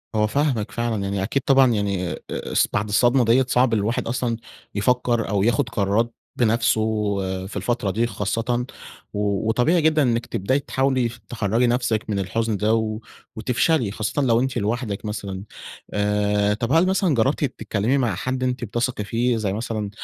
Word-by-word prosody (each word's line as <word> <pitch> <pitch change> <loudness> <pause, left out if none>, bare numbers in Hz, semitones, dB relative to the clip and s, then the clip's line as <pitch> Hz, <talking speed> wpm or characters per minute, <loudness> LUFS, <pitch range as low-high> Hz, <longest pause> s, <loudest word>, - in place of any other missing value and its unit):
هو 105 0 +3
فاهمِك 130 -4 0
فعلًا. 115 -3 -2
يعني 100 0 -2
أكيد 130 +7 0
طبعًا 135 -2 +5
يعني 100 -4 -1
أ - - -7
أص - - 0
بعد 105 - 0
الصدمة 120 +4 +3
ديّة 125 +4 +4
صعب 125 -1 +3
الواحد 110 +2 0
أصلًا 120 -1 -1 0.4
يفكّر 120 +2 +1
أو 100 -2 +1
ياخُد 120 +3 +2
قرارات 110 +2 0 0.2
بنفسه 115 -1 +2 0.7
في - - -7
الفترة 120 -5 -1
دي 115 +5 0
خاصةً. 115 +4 -1 0.5
و 100 0 -1
وطبيعي 155 +10 +3
جدًا 155 0 +3
إنِّك 120 -3 +1
تبدأي 130 +9 0
تحاولي 130 -3 0
ف 120 - -11
تخرّجي 115 +2 +1
نفسِك 120 -3 0
من 100 -2 0
الحُزن 110 +3 -1
ده 105 +2 +2
و 110 -1 0 0.4
وتفشلي. 125 +1 +1
خاصةً 110 +7 -2
لو 120 -4 +3
أنتِ 130 0 -1
لوحدِك 110 -1 -2
مثلًا. 100 -2 -5 0.5
آآ 105 0 +1
طب 115 +3 -2
هل 165 +4 +5
مثلًا 190 -5 +2
جرّبتِ 130 +6 +1
تتكلّمي 110 0 -1
مع 125 -4 0
حد 130 0 -2
أنتِ 125 -1 -1
بتثقي 120 0 -2
فيه 115 +3 0
زي 105 -3 -1
مثلًا 110 -1 -3
115 Hz, 170 wpm, -23 LUFS, 105-125 Hz, 0.7 s, طبعًا